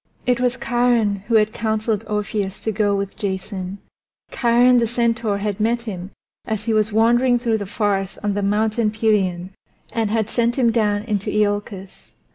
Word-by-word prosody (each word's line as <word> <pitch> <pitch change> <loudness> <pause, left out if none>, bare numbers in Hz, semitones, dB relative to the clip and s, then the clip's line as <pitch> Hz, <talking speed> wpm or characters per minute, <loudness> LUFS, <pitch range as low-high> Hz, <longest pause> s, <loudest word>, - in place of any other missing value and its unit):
It 250 -1 +2
was 250 0 +1
Chiron 240 -4 +1
who 230 - +1
had 215 0 +3
counseled 220 -1 -1
Orpheus 210 -1 -2
to 220 - -1
go 205 -1 +1
with 200 0 -3
Jason; 190 -1 -4 0.5
Chiron 245 +1 +4
the 230 - +1
centaur 230 -2 0
had 205 0 -3
met 230 +2 +1
him 190 -5 -6 0.3
as 220 -1 -4
he 230 - +1
was 215 0 +1
wandering 240 +3 +3
through 230 -2 0
the 200 - -5
forests 195 -2 -1
on 205 -1 0
the 205 - -1
Mountain 215 +2 +1
Pelion 195 -5 0 0.4
and 225 -2 0
had 220 -1 0
sent 235 +1 0
him 240 -4 +3
down 210 -2 +1
into 210 -3 -2
Iolcus. 205 -2 -2
215 Hz, 170 wpm, -21 LUFS, 205-235 Hz, 0.5 s, Chiron